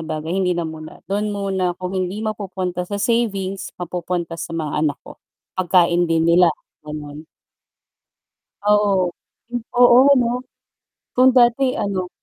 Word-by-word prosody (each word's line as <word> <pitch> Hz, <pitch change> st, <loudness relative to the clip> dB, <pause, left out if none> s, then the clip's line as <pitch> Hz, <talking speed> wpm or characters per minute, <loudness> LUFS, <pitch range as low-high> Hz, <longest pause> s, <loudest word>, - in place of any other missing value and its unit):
bagay 160 Hz, +1 st, -4 dB
hindi 180 Hz, -2 st, +1 dB
na 170 Hz, -, -1 dB
muna, 155 Hz, -1 st, -9 dB
dun 205 Hz, +2 st, -2 dB
muna 190 Hz, -3 st, -1 dB
kung 185 Hz, +1 st, -5 dB
hindi 190 Hz, +3 st, -3 dB
mapupunta 185 Hz, -4 st, -4 dB
sa 205 Hz, -, -3 dB
savings 200 Hz, -4 st, -1 dB
mapupunta 175 Hz, -1 st, -4 dB
sa 165 Hz, -, -5 dB
mga 155 Hz, -3 st, -3 dB
anak 150 Hz, -3 st, 0 dB
ko, -, -, -13 dB, 0.3 s
pagkain 175 Hz, -1 st, +2 dB
din 165 Hz, 0 st, +2 dB
nila, 170 Hz, +1 st, +5 dB, 0.3 s
ganon. 150 Hz, 0 st, -8 dB, 1.4 s
Oo. 200 Hz, -4 st, +3 dB, 0.7 s
Oo 240 Hz, -1 st, +8 dB, 0.2 s
ano, 245 Hz, -3 st, +2 dB, 0.8 s
kung 255 Hz, +1 st, +6 dB
dati 250 Hz, +2 st, +4 dB
ano 190 Hz, -2 st, -2 dB
180 Hz, 130 wpm, -20 LUFS, 170-200 Hz, 1.4 s, Oo